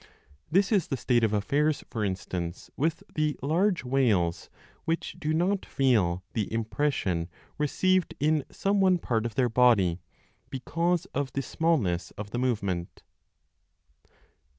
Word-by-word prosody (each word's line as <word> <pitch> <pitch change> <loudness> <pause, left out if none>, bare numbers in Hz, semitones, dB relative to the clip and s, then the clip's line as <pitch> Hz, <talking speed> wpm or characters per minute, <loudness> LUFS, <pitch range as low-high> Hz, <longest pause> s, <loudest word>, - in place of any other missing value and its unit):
This 195 +4 +3
is 200 -6 +2
the 135 - -2
state 120 -2 +2
of 110 - +3
affairs, 140 +9 +1
for 110 - -2
instance, 90 -3 -4
with 155 +3 -1
the 155 -2 0
large 175 +5 +2
whales 115 -10 +1 0.4
which 165 +1 -2
do 155 - -1
not 180 +5 +1
feel 100 -10 +1
the 110 -4 -2
impression 110 - -1 0.3
received 185 +5 +1
in 150 0 +2
some 200 0 0
one 185 -1 +5
part 115 -8 -1
of 115 - -9
their 130 -2 +3
body, 110 -8 +4 0.5
because 170 +6 -1
of 140 -1 -1
the 135 - -1
smallness 125 - 0
of 105 0 -6
the 120 - -2
movement. 100 -9 -2
130 Hz, 135 wpm, -28 LUFS, 105-160 Hz, 0.5 s, one